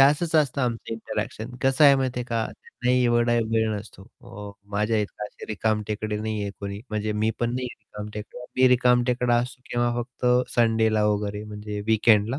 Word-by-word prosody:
असंच 150 +4 +4
असतं 145 -3 +2
आमचं 115 -2 -2
इंटरॅक्शन 110 +1 -5
कसं 135 +3 +4
आहे 140 - +9
माहिती 130 -2 -1
आहे - - -3
का 115 -2 -1 0.4
नाही 125 0 +4
एवढा 120 0 +3 0.2
वेळ 110 0 +2
नसतो. 105 -1 -8 0.2
अ, 105 0 -9 0.2
माझ्याइतकं 105 0 -1
असे - - -12
रिकाम 110 0 0
टेकडे 105 0 -2
नाही 110 -1 -2
आहे 100 - -3
कोणी 100 0 -5
म्हणजे 105 0 -1
मी 110 - +3
पण 120 0 +1
नाही 125 0 -2
आहे - - -12
रिकामटेकडे. 105 +3 -8
मी 130 0 +6
रिकामटेकडा 125 -1 +3
असतो 125 +2 -2
किंवा 120 0 +1
फक्त 125 +1 -5 0.3
संडेला 110 -2 +3
वगैरे 105 0 -1
म्हणजे 105 0 -6
वीकेंडला 110 +2 +3
115 Hz, 175 wpm, -25 LUFS, 105-125 Hz, 0.4 s, आहे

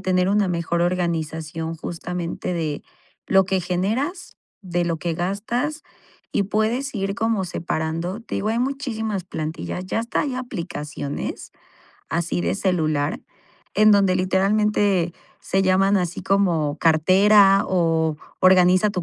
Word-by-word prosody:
tener 185 -1 +1
una 205 0 +2
mejor 170 -1 -1
organización, 165 -2 -2
justamente, 170 +2 -4
de 155 -4 -3 0.4
lo 190 0 +4
que 190 0 +1
generas, 220 - -2 0.2
de 175 -2 -1
lo 165 -2 -1
que 170 0 -2
gastas 225 - -2 0.5
y - - +1
puedes 225 +7 -1
ir 195 -1 -2
como 225 -3 0
separando 165 +3 -3
Te 230 - -7
digo, 210 - -1
hay 225 - 0
muchísimas 225 -7 -2
plantillas, 165 +2 -5
ya 225 - -1
hasta 230 +1 -1
hay 280 -3 -2
aplicaciones 160 - -5 0.6
así 170 +1 -1
de 185 - -1
celular, 155 -6 0 0.5
en 215 0 +6
donde 195 -2 +4
literalmente 195 -1 +2 0.3
se 195 0 0
llaman 195 +2 +3
así 175 -1 -3
como: 170 -7 +1
"Cartera 195 +5 +5
o 165 -3 +1 0.2
Organiza 185 +2 +5
tu 185 -3 -3
185 Hz, 130 wpm, -22 LUFS, 170-205 Hz, 0.6 s, en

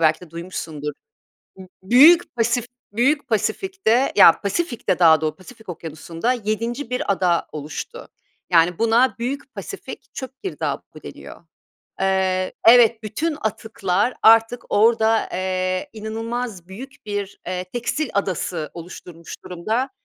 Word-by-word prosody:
belki 155 -1 +3
de 180 -3 -13
duymuşsundur. 165 -3 -6 0.7
B 190 -1 -11 0.2
Büyük 285 - +6
Pasif 235 0 +1 0.3
Büyük 280 +6 +1
Pasifik'te, 270 - 0
ya 185 -5 +7
Pasifik'te 240 - -1
daha 160 -3 +6
do 155 -1 -1
Pasifik 220 +2 -15
Okyanusu'nda 165 +6 -3
7'nci 230 +3 -3
bir 250 -4 -1
ada 180 -3 +1
oluştu. 155 - -7 0.4
Yani, 170 0 +3
buna 230 +3 +3
Büyük 260 +4 -4
Pasifik - - -9
çöp 260 +4 -8
girdabı 385 - -5
deniyor. - - -11 0.6
Eee, 190 -1 +1
evet, 230 -1 +6
bütün 295 +9 -2
atıklar 215 -1 -1
artık 225 +2 +5
orada, 225 +1 +3
eee, 185 +4 -2
inanılmaz 225 -3 -5
büyük 260 +7 -11
bir, 205 -1 -4
eee, 180 0 -3
tekstil 240 +8 -3
adası 180 -5 -2
oluşturmuş 170 -1 -10
durumda. 220 +9 -2
215 Hz, 120 wpm, -21 LUFS, 180-245 Hz, 0.7 s, ya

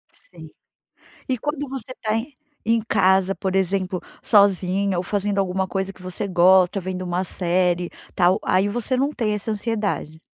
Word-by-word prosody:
Sim. - - -12 0.8
E 255 - 0
quando 290 +2 -3
você 255 -1 -7
tá 215 -2 -1
em 255 +5 -4 0.3
em 230 +1 +2
casa, 190 -3 +2
por 190 -1 -2
exemplo, 185 -1 0 0.2
sozinha 200 -1 +3
ou 175 - 0
fazendo 200 +1 -1
alguma 190 0 0
coisa 195 0 -3
que 190 - -21
você 185 +2 -5
gosta, 185 +2 +4
vendo 185 0 -4
uma 180 +1 -1
série 175 -1 0 0.2
tal, 180 +1 +3
aí 190 +2 +2
você 240 +4 -1
não 275 +3 +1
tem 225 -7 -1
essa 210 +2 -4
ansiedade? 210 -7 -2
195 Hz, 160 wpm, -22 LUFS, 185-220 Hz, 0.8 s, gosta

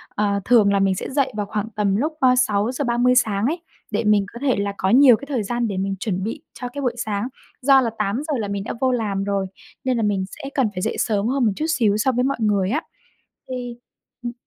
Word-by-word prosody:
ờ, 200 -1 +1
thường 215 -5 +5
là 200 - +3
mình 195 -1 +2
sẽ - - -5
dậy 275 -1 +1
vào 205 - -1
khoảng 210 +1 -3
tầm 200 -2 +1
lúc, 300 +9 0
ơ, 255 -2 +5
6:30 245 +2 +2
sáng 215 -4 +2
ấy, 325 +6 -1 0.3
để 215 +2 0
mình 210 -2 +3
có 235 - -8
thể 275 -3 +2
là 200 0 -1
có 190 - 0
nhiều 255 0 +7
cái 280 - -9
thời 255 -7 -1
gian 240 +3 -1
để 200 -3 -3
mình 195 +1 -1
chuẩn 190 -4 -2
bị 230 +8 -4
cho 250 - -6
cái 285 - -4
buổi 245 -3 -1
sáng. 210 -1 -2 0.3
Do 270 0 +6
là 240 - 0
8:00 230 +10 -1
là 210 - -2
mình 200 0 -3
đã - - -4
vô 260 -1 +3
làm 210 -5 -1
rồi 200 -1 -1 0.4
nên 255 -2 0
là 225 - 0
mình 200 -2 0
sẽ 275 +8 -8
cần 265 -5 +2
phải 180 - -3
dậy - - -1
sớm 210 -2 +1
hơn 260 0 +1
một 215 - +3
chút 310 - -2
xíu 220 -10 +2
so 245 +5 +2
với 250 0 0
mọi 275 +1 0
người 200 -3 +2
á. 295 +8 0 0.7
Thì 250 -2 -5 0.5
ừm. 240 -1 -4
225 Hz, 250 wpm, -22 LUFS, 200-255 Hz, 0.7 s, nhiều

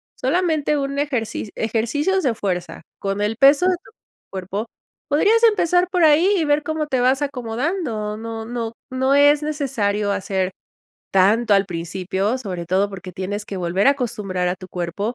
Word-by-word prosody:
Solamente 310 0 +1
un 275 0 -2
ejerci 250 -7 -2
ejercicios 240 - 0
de 255 -8 0
fuerza 180 -5 -3 0.2
con 195 +1 -2
el 210 +2 -1
peso 280 +7 +6
de 370 - +4
tu - - -17 0.4
cuerpo, 195 +4 -4 0.4
podrías 410 +11 +3
empezar 360 -5 +4
por 360 -2 +1
ahí 320 +6 +5
y 335 - +1
ver 295 0 +2
cómo 315 0 -2
te 265 -3 0
vas 260 +3 +2
acomodando, 250 - -2
no 225 0 -6
no 230 -1 -4 0.2
no 260 +1 +1
es 290 +1 +5
necesario 240 -9 -1
hacer 190 -1 -1 0.6
tanto 205 +4 +4
al 195 0 +3
principio, 190 +5 -2
sobre 185 -8 -5
todo 190 +3 +1
porque, 190 -1 -8
tienes 200 +3 -4
que 200 - -6
volver 180 +3 0
a - - +8
acostumbrar 210 -9 -2
a 180 - -1
tu 185 - -10
cuerpo, 180 +6 -3
230 Hz, 165 wpm, -21 LUFS, 195-290 Hz, 0.6 s, a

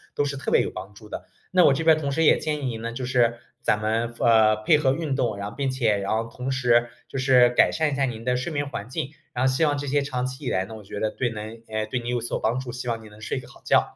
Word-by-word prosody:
都 145 - +1
是 140 0 -2
特 - - -4
别 - - +5
有 - - -3
帮 95 +2 -8
助 105 0 -13
的。 - - -7 0.3
那 185 -1 +5
我 - - +7
这 165 - -1
边 160 -1 +6
同 140 -2 -2
时 160 +3 +1
也 - - +6
建 155 -1 -1
议 - - -3
您 115 -3 -3
呢， 115 0 -3
就 125 +2 -4
是 120 -2 +2 0.2
咱 105 - +2
们， 115 +2 -1
呃， 110 -2 +5
配 110 +8 +4
合 135 -3 +2
运 150 -2 -2
动， 115 -6 0
然 100 +1 -4
后 - - -13
并 140 -1 -1
且 120 -5 +1
然 100 0 -3
后 115 +1 0
同 125 +3 -4
时， 120 -2 +3 0.2
就 - - -6
是 130 -2 +5
改 120 - +4
善 155 -2 0
一 - - -1
下 140 0 +2
您 115 -3 -5
的 125 0 +2
睡 125 +7 -3
眠 145 -1 -2
环 115 -5 -6
境， 130 +2 -3 0.2
然 125 +1 0
后 130 - +4
希 130 +5 +1
望 145 -2 +2
这 145 0 -4
些 145 +2 +2
长 125 -3 -2
期 130 +3 -6
以 - - 0
来 95 0 0
呢， 110 - -9
我 110 - -11
觉 100 +1 -7
得 110 - 0
对 125 - -1
能 110 +1 -7 0.3
对 125 - -1
你 120 - -5
有 125 0 0
所 120 - -2
帮 115 +4 0
助， 130 -2 -6
希 125 0 -6
望 115 -1 -2
你 110 - -12
能 105 +1 -16
睡 120 - -3
个 125 - -12
好 - - -17
觉。 - - +2
125 Hz, 335 characters per minute, -25 LUFS, 115-135 Hz, 0.3 s, 我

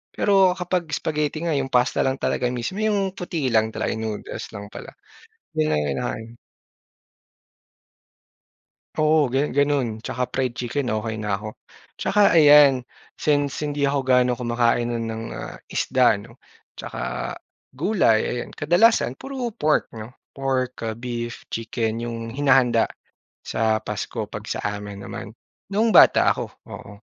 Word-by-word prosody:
Pero 195 -2 +4
kapag 180 -1 -1
spaghetti 150 +1 -1
nga, 160 - +1
yung 135 -1 -2
pasta 125 +1 +2
lang 135 0 -1
talaga 125 - 0
mismo, 125 +9 -4
yung 200 -3 0
puti 170 -6 -3
lang 110 0 +3
talaga, - - -2
yung 110 0 -4
noodles - - -7
lang 100 0 -7
pala, - - -9 0.7
yung 75 0 +2
ang 75 -1 +1
kinakain. 110 +11 -4 2.6
Oo, 155 -2 +3
ganu 135 +4 0
ganun 145 -2 +2
'tsaka 125 +2 -3
fried 130 -3 -1
chicken, 125 +3 -2
okey 110 0 -2
na 105 -2 -1
ako. 105 +2 -7 0.5
'Tsaka 205 0 +4
ayan, 145 -4 +7 0.4
since 145 -2 +1
hindi 145 -1 -1
ako 140 0 +2
gaano 125 -1 +3
kumakain 120 -1 +1
nun 115 -1 -2
ng, 110 0 -5
ah, - - -7
isda - - +2
no, - - -13 0.3
'tsaka - - -5 0.4
gulay, 155 - +3
ayan. 120 - -3
Kadalasan 175 - +3
puro 260 -4 -4
pork 155 -8 0
'no, 110 -1 -8 0.2
pork 130 -2 -2
ah, 110 - -4
beef, 120 0 -5
chicken 115 0 -2
yung 115 -1 -5
hinahanda 130 -4 +3 0.5
sa 110 -1 0
Pasko - - -4
'pag - - -7
sa - - -2
amin 105 -1 -6
naman 100 +1 -7 0.4
noong 220 +2 +2
bata - - +7
ako, - - -3 0.2
oo. 100 - -10
130 Hz, 140 wpm, -23 LUFS, 115-150 Hz, 2.6 s, ayan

